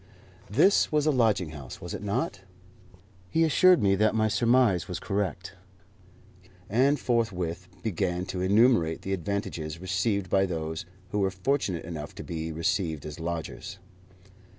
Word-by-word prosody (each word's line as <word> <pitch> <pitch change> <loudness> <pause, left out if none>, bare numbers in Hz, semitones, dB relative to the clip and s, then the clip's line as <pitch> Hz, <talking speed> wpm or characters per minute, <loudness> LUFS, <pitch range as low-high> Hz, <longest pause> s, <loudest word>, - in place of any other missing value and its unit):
This 160 - +4
was 150 -1 +2
a 155 - +4
lodging 110 - +2
house, 70 -5 -9
was - - -7
it - - -5
not? 105 - -2 0.9
He 165 - +2
assured 180 - +5
me 100 -1 +4
that 110 +2 +2
my 110 0 +3
surmise 115 -3 +3
was 90 - -4
correct, 95 -2 -3 1.1
and 135 +7 +3
forthwith 90 -7 -1 0.2
began 90 -3 -1
to 90 -1 -4
enumerate 100 -4 +3
the 95 - -2
advantages 85 -4 -3
received 95 +2 -1
by 95 +1 +2
those 80 -1 -4 0.2
who 105 - 0
were 95 -1 +2
fortunate 95 - -1
enough 80 -3 -7
to - - -7
be 80 -1 -4
received 85 -2 -1
as 75 +1 -7
lodgers. 85 +3 -5
95 Hz, 145 wpm, -27 LUFS, 85-115 Hz, 1.1 s, assured